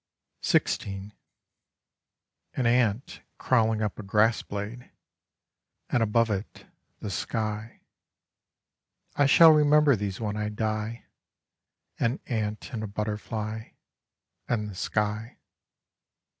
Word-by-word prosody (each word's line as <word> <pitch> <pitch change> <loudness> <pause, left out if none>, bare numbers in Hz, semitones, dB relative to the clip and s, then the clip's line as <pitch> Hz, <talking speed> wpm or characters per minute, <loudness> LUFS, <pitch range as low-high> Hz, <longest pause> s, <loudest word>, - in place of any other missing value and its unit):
XVI 100 +1 0 1.4
An 130 - 0
ant 115 -1 +1 0.2
crawling 110 -3 +2
up 105 - -3
a - - -3
grass 105 +3 +2
blade, 105 +5 -6 1.0
And 120 - +2
above 115 +1 +2
it, 100 +1 -5 0.4
the 105 - -4
sky. 110 +3 -3 1.3
I 145 - +4
shall 165 +3 +8
remember 150 -2 +5
these 100 -2 -4
when 105 -2 -2
I 105 0 -1
die: 110 +1 -3 0.9
An 115 +4 0
ant 110 +1 -3
and 110 - -3
a 110 - -3
butterfly 110 +1 -4 0.7
And 105 -3 -1
the 105 - -7
sky. 105 +4 -2
110 Hz, 100 wpm, -27 LUFS, 105-115 Hz, 1.4 s, shall